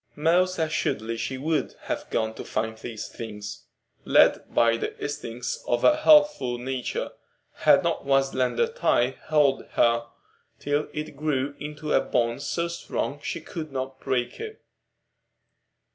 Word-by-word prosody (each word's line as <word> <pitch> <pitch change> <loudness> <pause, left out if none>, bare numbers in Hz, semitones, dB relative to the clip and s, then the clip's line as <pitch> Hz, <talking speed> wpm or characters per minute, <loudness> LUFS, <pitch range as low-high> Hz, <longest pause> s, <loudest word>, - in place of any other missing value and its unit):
Most 180 +4 +2
assuredly 115 -8 -1
she 130 +3 -3
would 155 +3 -1
have - - -4
gone 110 0 0
to - - -7
find 110 +1 -2
these 110 -1 -6
things, 105 -2 -8 0.4
led - - +4
by 115 -1 +4
the 115 - -4
instincts 120 -4 -4
of 120 - +1
a 305 - +6
healthful 295 - +5
nature, 125 0 -3 0.5
had - - +5
not - - -1
one 135 -1 +4
slender 135 - +1
tie 135 - +1
held 145 -3 +3
her 115 0 +3 0.5
till 145 +1 -1
it 150 0 -5
grew 145 -2 -1
into 150 +1 -4
a - - +5
bond 120 +1 0
so 170 +4 -1
strong 145 -4 -4
she 170 - -4
could 155 -1 -7
not 130 0 -4
break 125 - -2
it. 445 0 -7
135 Hz, 145 wpm, -26 LUFS, 120-155 Hz, 0.5 s, a